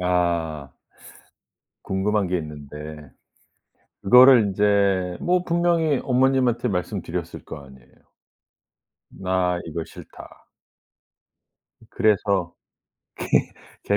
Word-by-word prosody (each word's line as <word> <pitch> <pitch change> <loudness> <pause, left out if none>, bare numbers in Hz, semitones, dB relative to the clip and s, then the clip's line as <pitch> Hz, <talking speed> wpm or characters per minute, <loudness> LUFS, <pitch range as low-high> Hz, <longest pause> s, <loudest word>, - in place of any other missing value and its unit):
아. 85 -5 -1 1.1
궁금한 100 +1 0
게 90 0 -1
있는데. 75 -1 -9 0.9
그거를 125 +4 +8
인제 100 -3 +1
뭐 180 0 +1
분명히 170 -4 +1
어머님한테 130 -2 +1
말씀드렸을 90 -3 -4
거 - - -8
아니에요. 65 -2 -18 1.2
나 90 -1 -1
이거 80 0 -5
싫다. - - -14 1.5
그래서 100 -4 +1 1.3
개 100 - +1
95 Hz, 175 characters per minute, -23 LUFS, 85-120 Hz, 1.5 s, 그거를